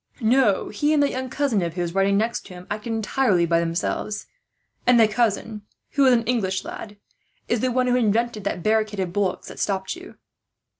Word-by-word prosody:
"No, 230 -3 +2
he 295 +9 +1
and 290 - +4
that 285 - +1
young 260 0 -4
cousin 265 -7 0
of 170 -1 -3
his, 175 -2 -2
riding 195 +1 +2
next 225 +3 -1
to 185 - -11
him, 180 0 -11
acted 215 +3 -4
entirely 220 -4 +1
by 170 0 +2
themselves; 170 +5 -2 0.6
and 245 -1 +6
the 225 - +6
cousin, 215 -1 -1 0.3
who 275 -1 +3
is 255 - +6
an 230 -1 +2
English 205 -5 -1
lad, 210 -1 -8 0.5
is 235 - +1
the 255 +2 0
one 255 +1 +1
who 250 0 +2
invented 230 -2 +1
that 175 - -2
barricade 215 -1 +1
of 180 -2 -2
bullocks 195 -2 -1
that - - -10
stopped 190 - -1
you." 360 +1 -12
215 Hz, 200 wpm, -23 LUFS, 195-245 Hz, 0.6 s, and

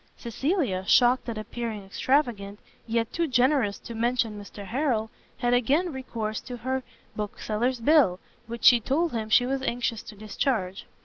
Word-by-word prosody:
Cecilia, 245 - -1
shocked 245 0 +4
at 225 - -4
appearing 215 -1 -5
extravagant, 210 -2 0 0.3
yet 230 0 -1
too 335 -1 0
generous 250 -5 +2
to 235 - -9
mention 230 -2 0
Mr 205 0 -10
Harrel, 230 -1 -1 0.3
had 245 -1 +1
again 285 +8 +2
recourse 225 -5 -4
to 250 -1 -7
her 260 +3 -2 0.3
bookseller's 215 +4 -2
bill, 235 - +4 0.3
which 235 0 -7
she 245 -2 +8
told 300 +9 0
him 220 -2 -3
she 245 +3 +5
was 270 +1 -1
anxious 240 -3 -1
to - - -11
discharge. 210 -2 -2
235 Hz, 150 wpm, -26 LUFS, 215-260 Hz, 0.3 s, she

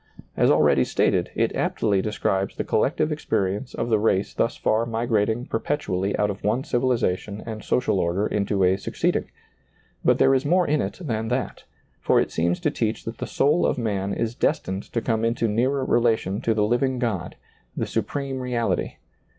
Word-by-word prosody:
As - - +3
already - - +4
stated, - - +1
it - - 0
aptly 100 -2 +1
describes 100 -2 -1
the - - -2
collective 155 0 +1
experience 105 -6 -2
of - - -2
the 110 -2 +3
race 105 -2 +1
thus - - 0
far 110 +1 +1
migrating 115 0 0
perpetually 100 -13 -1
out 105 0 +1
of 100 - -9
one 115 +6 +1
civilization 115 -6 -1
and 110 -2 -6
social 125 -6 +1
order 90 +4 0
into 100 -2 0
a 95 +1 +3
succeeding; 95 - -1 0.8
but - - +4
there 135 - +4
is 130 0 +2
more 175 +4 +3
in 150 0 +2
it - - -4
than 110 -8 -2
that, 125 +2 -3 0.3
for - - +3
it - - 0
seems 85 +2 0
to 150 - +1
teach 115 -6 -2
that 115 0 -6
the - - -3
soul 150 +5 +2
of - - +1
man 100 -4 -1
is 115 +2 -2
destined 100 -7 -1
to 115 - -1
come 110 -1 0
into 115 0 +1
nearer 130 +5 +1
relation 115 -5 +1
to 115 - +1
the 105 - +2
hving 125 +4 +1
God, 105 -7 -2 0.4
the - - 0
Supreme 140 -2 -3
Reality. 125 -2 -1
115 Hz, 180 wpm, -24 LUFS, 100-125 Hz, 0.8 s, already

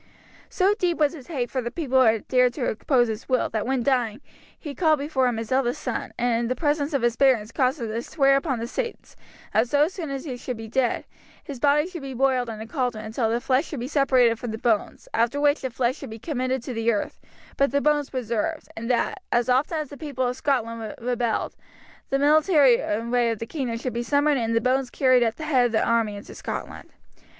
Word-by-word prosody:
So 385 +2 +2
deep 350 -2 +1
was 295 -2 +2
his 275 -6 -11
hate 255 -8 -3
for 260 - -1
the 240 - -3
people 265 -2 0
who 255 - +6
had 220 -1 +1
dared 250 -1 +3
to 260 - -2
oppose 240 +2 +2
his 220 0 -6
will 255 -1 +1
that 220 0 -2
when 260 -2 0
dying 245 -3 +1 0.4
he 295 -4 -7
called 315 -1 +3
before 275 -3 0
him 240 -2 -1
his 225 +1 -5
eldest 255 -2 +1
son, - - -4
and 240 -1 +1
in 235 - -1
the 255 - -1
presence 295 -1 0
of 265 - 0
his 240 -1 +2
barons 235 -5 +3
caused 265 +2 +1
him 230 - -3
to 220 +2 -3
swear 275 +1 +2
upon 275 -2 0
the 230 - -3
saints 465 - -5 0.4
that 220 +3 +2
so 290 +2 +4
soon 340 -3 -6
as 275 +1 -5
he 255 -5 -5
should 245 -1 -5
be 225 0 -7
dead 245 +2 0 0.4
his 275 -4 -8
body 290 +2 +3
should 355 -3 -7
be 270 -1 -6
boiled 255 -1 +1
in 220 -1 -6
a 220 - -6
cauldron 245 -4 -2
until 220 +1 -1
the 230 +1 0
flesh 260 +4 +1
should 295 - -6
be 245 - -4
separated 260 -5 +3
from 245 - -5
the 220 - -4
bones, 220 -2 -1
after 235 +5 +1
which 290 +1 +2
the 260 - -2
flesh 245 +1 -1
should - - -8
be 220 - -7
committed 255 -1 -2
to 255 - -5
the 225 0 +1
earth, 210 - -3 0.3
but 275 - +2
the 280 +3 +1
bones 295 -1 +1
preserved, 255 +5 -3
and 230 +2 -5
that, 245 - 0
as 240 +1 +1
often 275 +6 +2
as 305 -3 -3
the 285 - -10
people 275 -4 -3
of 245 - -2
Scotland 230 -5 -2
rebelled, 240 -1 -1 0.5
the 275 - +2
military 290 -3 +5
array 235 +3 0
of 225 - -1
the 230 - -5
kingdom 240 -2 -3
should 250 +2 -4
be 235 - -2
summoned 285 +3 +2
and 230 -1 -1
the 230 - +3
bones 255 +1 +1
carried 255 -2 +3
at 225 -2 +1
the 315 - -6
head 260 -5 +3
of - - -7
the 220 - +2
army 230 -3 +1
into 200 - -10
Scotland. - - -6
255 Hz, 240 wpm, -24 LUFS, 230-280 Hz, 0.5 s, who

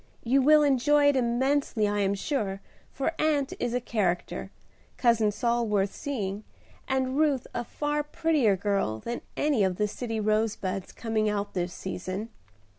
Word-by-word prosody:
You 265 +4 +3
will 300 +2 +6
enjoy 285 +1 +4
it 285 - +2
immensely 255 -2 +1
I 205 0 0
am 200 0 +1
sure, 200 -4 -2 0.3
for 275 +4 -1
Aunt 295 -3 +1
is 245 0 -1
a - - +2
character. 200 -8 -2 0.5
Cousin 230 -4 +3
Saul 235 +1 0
worth 200 -2 +1
seeing, 210 -7 -4 0.4
and 265 +1 0
Ruth 290 -5 +2
a - - -2
far 295 +4 -2
prettier 295 -8 +2
girl 195 - 0
than 235 - -5 0.2
any 285 -8 +2
of 185 -1 +1
the 210 +3 0
city 225 +1 -4
rose 215 +1 +1
buds 190 0 -4
coming 220 -2 -1
out 205 -1 -2
this 175 -1 -2
season. 190 +4 -5
230 Hz, 160 wpm, -27 LUFS, 200-275 Hz, 0.5 s, will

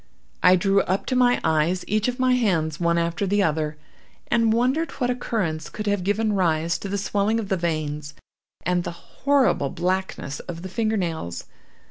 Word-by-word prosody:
I 180 0 +7
drew 195 +2 +3
up 190 +2 -1
to 255 - -1
my 245 -1 +4
eyes 160 +3 +1
each 215 +2 +1
of 250 0 -2
my 255 -1 +3
hands, 165 -11 +1
one 170 -1 +2
after 170 +4 0
the 205 +1 +2
other, 155 -2 -1 0.5
and 230 -1 +3
wondered 260 +8 +1
what 250 -2 0
occurrence 185 -10 -2
could 210 - -6
have 205 -3 0
given 210 +3 +1
rise 165 -3 +1
to 200 - -6
the 200 - -1
swelling 205 +2 0
of 205 -3 -5
the 190 - +2
veins, 150 -4 -3 0.5
and 180 0 +1
the - - -3 0.3
horrible 270 - +3
blackness 180 -5 -2
of 170 -1 -7
the 190 - -5
fingernails. 180 - -2
190 Hz, 175 wpm, -24 LUFS, 165-220 Hz, 0.5 s, I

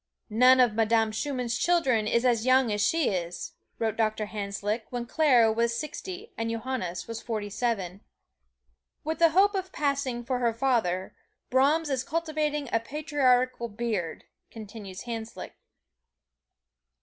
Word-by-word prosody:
"None 250 +4 +6
of 245 -4 +5
Madame 225 0 +2
Schumann's 250 -1 -2
children 265 -11 +2
is 235 +3 +1
as 235 -3 +3
young 255 -2 +4
as 205 0 0
she 325 +6 +2
is," 175 -2 -4 0.2
wrote 220 -2 -1
Doctor 220 -1 0
Hanslick, 205 +1 -3
when 245 -1 -4
Clara 250 -5 +4
was 235 +1 0
sixty 370 - -7
and 225 0 -1
Johannes 230 -6 -3
was 230 -1 -5
forty 215 -3 -4
seven. 200 -5 -2 1.0
"With 315 +1 -3
the 335 -1 +6
hope 390 +5 +4
of 375 -1 -3
passing 280 -6 -1
for 250 +1 -2
her 235 -2 +1
father, 225 -8 0 0.4
Brahms 290 +4 +3
is 260 -1 0
cultivating 305 -2 -2
a 230 - +4
patriarchal 255 -3 +1
beard," 210 -6 -3 0.3
continues 205 -3 -9
Hanslick. 230 -1 -6
235 Hz, 135 wpm, -27 LUFS, 220-280 Hz, 1.0 s, None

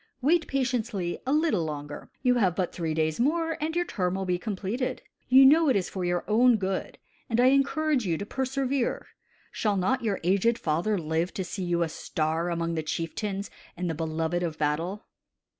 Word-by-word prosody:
Wait 320 +5 +2
patiently 235 -9 -1
a - - +1
little 300 - +2
longer. 145 -1 -6
You 250 -1 +4
have 185 -7 +2
but 180 -2 -1
three 160 -3 -2
days 155 -1 0
more, 325 +5 +1
and 320 +2 -2
your 350 0 +1
term 185 - -1
will 190 0 -2
be 180 -1 0
completed. 210 +5 -3 0.3
You 265 +1 +8
know 310 +3 +6
it 260 - +3
is 190 -3 0
for 185 - -4
your 175 0 0
own 235 +2 +5
good, 190 -1 -3 0.3
and 230 0 +1
I 250 +1 +6
encourage 275 0 +2
you 170 -5 0
to 200 - -5
persevere. 265 +1 -1 0.5
Shall 210 -3 0
not 245 +8 +1
your 210 -4 0
aged 200 +6 +2
father 175 +6 0
live 160 +1 -1
to 190 - -2
see 185 +2 -5
you 170 -1 +1
a - - -1
star 160 +2 -2
among 170 -1 -1
the 160 - -1
chieftains 195 +6 -3 0.3
and 180 +1 -2
the 165 - -1
beloved 160 +2 -2
of 165 -3 -3
battle?" 165 +7 -1
195 Hz, 190 wpm, -27 LUFS, 170-255 Hz, 0.5 s, You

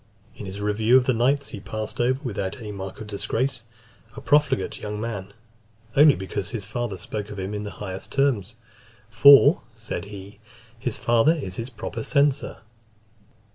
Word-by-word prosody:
In 100 - -8
his 95 +1 -7
review 110 +4 +3
of 130 - +2
the 130 - +2
knights, 135 +5 +1
he 105 - -7
passed 110 +1 -6
over, 130 +2 +1
without 100 -6 -3
any 110 -4 -7
mark 95 -1 -7
of - - -6
disgrace, 120 +5 -2 0.5
a - - -7
profligate 145 -9 +2
young 105 0 -4
man, 100 -4 -5 0.6
only 145 0 +7
because 95 0 -4
his 110 -5 -5
father 110 -1 -4
spoke 105 +3 -5
of 105 - -8
him 95 +2 -4
in 105 0 -4
the - - -4
highest 95 -2 -7
terms; 120 -6 0 0.6
"for," 140 +6 +7
said 110 -3 -5
he, 100 0 -10 0.4
"his 120 -1 -3
father 120 +6 +3
is 100 - -5
his 115 +2 -4
proper 115 -1 -6
censor." 140 +3 +1
110 Hz, 170 wpm, -24 LUFS, 100-130 Hz, 0.6 s, only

